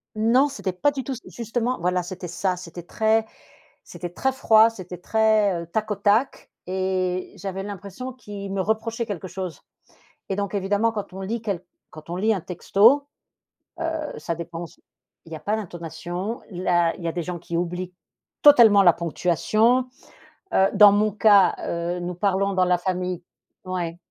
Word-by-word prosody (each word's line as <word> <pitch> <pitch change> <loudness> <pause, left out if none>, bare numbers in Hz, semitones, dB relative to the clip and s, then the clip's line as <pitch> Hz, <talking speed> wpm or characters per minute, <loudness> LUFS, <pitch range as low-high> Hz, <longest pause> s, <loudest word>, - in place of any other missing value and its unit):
non, 235 +6 +4
c'était 210 -9 -3
pas 285 +11 +1
du 270 -2 -4
tout 270 - -4
ç 245 - -7
justement 240 +2 -2
voilà 180 +1 0
c'était 180 0 -7
ça. 180 +2 -1
C'était 175 -1 -9
très 220 +4 +1 0.6
c'était 175 - -7
très 265 +9 -1
froid, 225 -4 +5
c'était 180 -5 -9
très, 215 -2 +2
heu, - - -9
tac-au-tac 210 +4 0 0.2
et 185 -1 -1
j'avais 195 0 -5
l'impression 205 +5 -7
qu'il 200 -5 -8
me 195 - 0
reprochait 225 +3 -1
quelque 190 -3 -5
chose 185 -2 -6 0.7
et 195 - -2
donc 200 0 -3
évidemment 205 +3 +1
quand 205 -4 -5
on 190 - -8
lit 220 +4 -3
quel 195 -5 -3 0.3
quand 155 +2 -12
on 175 - -3
lit 220 +4 +2
un 190 - -3
texto, 215 - +3 0.9
heu, 305 -2 -5
ça 170 - -3
dépend 170 +1 -6
s - - -17 0.5
il 165 - -15
y - - -3
a - - -8
pas 210 +2 -1
d'intonation, 175 +2 -5
la 175 -2 +1
il 175 - -10
y - - -2
a - - 0
des 175 -2 -3
gens 175 -1 -5
qui 170 0 -6
oublient 180 +1 -3 0.5
totalement 230 -9 +8
la 175 -2 +7
ponctuation. 215 +9 +1 0.7
Heu, 190 - +5
dans 205 0 +8
mon 210 +1 +2
cas, 205 -2 +5
heu, 170 +1 -2
nous 175 0 -4
parlons 195 +1 +1
dans 185 -1 +3
la 180 0 +3
famille 180 -1 -3 0.4
ouais, 175 -2 -3
195 Hz, 175 wpm, -24 LUFS, 180-220 Hz, 0.9 s, totalement